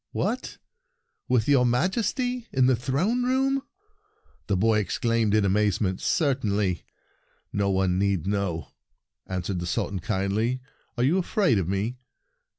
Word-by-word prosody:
" -, -, -61 dB
What! 230 Hz, +6 st, -2 dB, 0.7 s
—with 125 Hz, -3 st, +2 dB
your 140 Hz, -3 st, +5 dB
Majesty, 225 Hz, -, 0 dB
in 130 Hz, -1 st, +3 dB
the 130 Hz, 0 st, +4 dB
throne 145 Hz, -, 0 dB
room?" 270 Hz, +2 st, +1 dB, 0.9 s
the 100 Hz, -, +1 dB
boy 110 Hz, +2 st, +3 dB
exclaimed 110 Hz, +2 st, +1 dB
in 105 Hz, -2 st, +3 dB
amazement. 100 Hz, -1 st, +1 dB
"Certainly. 105 Hz, -, 0 dB, 0.7 s
No 100 Hz, -1 st, +1 dB
one 95 Hz, -1 st, +1 dB
need 100 Hz, -5 st, +1 dB
know," 100 Hz, -5 st, -2 dB, 0.6 s
answered 90 Hz, 0 st, -3 dB
the 85 Hz, -, -4 dB
Sultan 95 Hz, +2 st, -1 dB
kindly. 110 Hz, +5 st, -1 dB, 0.4 s
"Are 120 Hz, -, +1 dB
you 160 Hz, +9 st, +3 dB
afraid 175 Hz, -, +2 dB
of 90 Hz, -, -2 dB
me?" 105 Hz, +6 st, -2 dB
110 Hz, 135 wpm, -26 LUFS, 100-140 Hz, 0.9 s, your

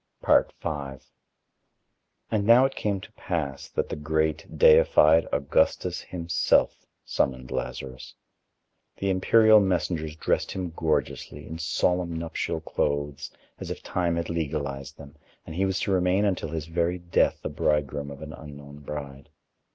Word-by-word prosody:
V -, -, 0 dB, 2.0 s
And 105 Hz, -2 st, +1 dB
now 120 Hz, +3 st, +7 dB
it 135 Hz, -, -1 dB
came 100 Hz, -2 st, -1 dB
to 110 Hz, -, -12 dB
pass 80 Hz, -10 st, -4 dB
that -, -, -2 dB
the -, -, -3 dB
great, 80 Hz, +1 st, -1 dB
deified 80 Hz, +2 st, +6 dB
Augustus 70 Hz, -1 st, +1 dB
himself 85 Hz, -2 st, 0 dB, 0.2 s
summoned 65 Hz, -1 st, -1 dB
Lazarus. 65 Hz, -1 st, -5 dB, 0.8 s
The 100 Hz, 0 st, 0 dB
imperial 110 Hz, +3 st, +6 dB
messengers 85 Hz, -5 st, -1 dB
dressed -, -, -1 dB
him 90 Hz, -3 st, -4 dB
gorgeously, 80 Hz, -2 st, -2 dB
in 80 Hz, +1 st, -7 dB
solemn 85 Hz, +2 st, 0 dB
nuptial 80 Hz, -1 st, -3 dB
clothes, 70 Hz, -2 st, -2 dB, 0.3 s
as -, -, -6 dB
if -, -, -6 dB
Time 85 Hz, -2 st, -1 dB
had 85 Hz, 0 st, -2 dB
legalized 70 Hz, -4 st, -4 dB
them, 70 Hz, 0 st, -13 dB, 0.3 s
and -, -, -8 dB
he 95 Hz, +3 st, +1 dB
was 95 Hz, 0 st, -1 dB
to 100 Hz, -, -1 dB
remain 95 Hz, +2 st, +2 dB
until 95 Hz, -5 st, -1 dB
his 80 Hz, -1 st, -4 dB
very 85 Hz, +2 st, -1 dB
death 85 Hz, -1 st, +1 dB
the -, -, -2 dB
bridegroom 75 Hz, -1 st, -1 dB
of 70 Hz, +2 st, -9 dB
an 75 Hz, -1 st, -8 dB
unknown 70 Hz, -1 st, -11 dB
bride. 70 Hz, -2 st, -8 dB
80 Hz, 140 wpm, -26 LUFS, 75-90 Hz, 2.0 s, now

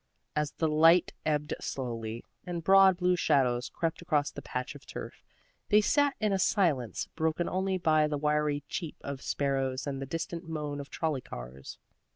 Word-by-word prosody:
As 150 Hz, -1 st, 0 dB
the 160 Hz, -, 0 dB
light 165 Hz, +3 st, +5 dB
ebbed 150 Hz, -1 st, 0 dB
slowly, 115 Hz, -3 st, -4 dB, 0.2 s
and 175 Hz, -2 st, -4 dB
broad 190 Hz, 0 st, +6 dB
blue 180 Hz, 0 st, +2 dB
shadows 130 Hz, -7 st, +2 dB
crept 165 Hz, 0 st, -2 dB
across 150 Hz, -4 st, +1 dB
the 140 Hz, -, -8 dB
patch 125 Hz, -2 st, -4 dB
of -, -, -13 dB
turf, -, -, -8 dB, 0.5 s
they 210 Hz, -, +6 dB
sat 285 Hz, +6 st, +3 dB
in 215 Hz, -2 st, +1 dB
a 195 Hz, -, +1 dB
silence 150 Hz, -, +1 dB
broken 160 Hz, +1 st, 0 dB
only 190 Hz, +1 st, 0 dB
by 155 Hz, -3 st, +3 dB
the 150 Hz, -1 st, -2 dB
wiry 150 Hz, 0 st, +1 dB
cheep 165 Hz, -3 st, -5 dB
of 140 Hz, -1 st, -5 dB
sparrows 135 Hz, -2 st, -1 dB
and 135 Hz, -2 st, -3 dB
the 135 Hz, -, -4 dB
distant 165 Hz, +3 st, -4 dB
moan 150 Hz, -2 st, -3 dB
of 140 Hz, -, -7 dB
trolley 155 Hz, -5 st, -1 dB
cars. 65 Hz, -, -9 dB
150 Hz, 175 wpm, -30 LUFS, 135-175 Hz, 0.5 s, broad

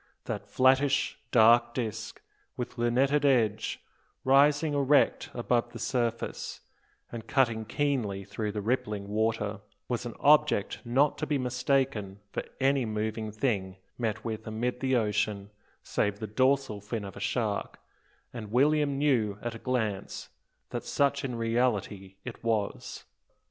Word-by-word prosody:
That -, -, -4 dB
flattish, 135 Hz, +1 st, +3 dB
dark 120 Hz, +1 st, +5 dB
disc, 115 Hz, -5 st, -4 dB, 0.3 s
with 125 Hz, 0 st, -5 dB
lunetted 135 Hz, +5 st, +2 dB
edge, 115 Hz, -6 st, +2 dB, 0.4 s
rising 145 Hz, +3 st, +4 dB
erect 140 Hz, 0 st, +3 dB
above 120 Hz, 0 st, 0 dB
the -, -, -6 dB
surface, 120 Hz, -3 st, -2 dB, 0.5 s
and 115 Hz, -2 st, -7 dB
cutting 115 Hz, -5 st, +2 dB
keenly 110 Hz, -6 st, -1 dB
through 100 Hz, +2 st, -4 dB
the 105 Hz, -2 st, -3 dB
rippling 105 Hz, -3 st, -1 dB
water, 110 Hz, -1 st, 0 dB, 0.3 s
was 120 Hz, 0 st, -2 dB
an 120 Hz, -, -7 dB
object 150 Hz, -8 st, +3 dB
not 135 Hz, +5 st, +2 dB
to -, -, -2 dB
be 145 Hz, -, +1 dB
mistaken 125 Hz, -5 st, 0 dB
for -, -, -2 dB, 0.2 s
any 135 Hz, 0 st, +3 dB
moving 110 Hz, 0 st, -3 dB
thing 105 Hz, -5 st, -1 dB, 0.2 s
met 110 Hz, -2 st, -3 dB
with 110 Hz, -1 st, -4 dB
amid 120 Hz, +3 st, -2 dB
the 130 Hz, -1 st, +1 dB
ocean, 105 Hz, -2 st, 0 dB, 0.3 s
save 105 Hz, -1 st, -1 dB
the 110 Hz, -, -5 dB
dorsal 130 Hz, 0 st, +1 dB
fin 105 Hz, 0 st, -4 dB
of 100 Hz, -, -8 dB
a -, -, -8 dB
shark, 105 Hz, 0 st, -2 dB, 0.6 s
and 110 Hz, -4 st, -7 dB
William 145 Hz, +2 st, +3 dB
knew 120 Hz, -8 st, +1 dB
at 120 Hz, -1 st, -3 dB
a 115 Hz, -, -8 dB
glance 110 Hz, -6 st, -2 dB, 0.4 s
that -, -, -3 dB
such 140 Hz, 0 st, +1 dB
in 125 Hz, -3 st, -3 dB
reality 115 Hz, -5 st, -1 dB
it 125 Hz, -2 st, -8 dB
was. 110 Hz, -3 st, -2 dB
115 Hz, 140 wpm, -29 LUFS, 105-135 Hz, 0.6 s, dark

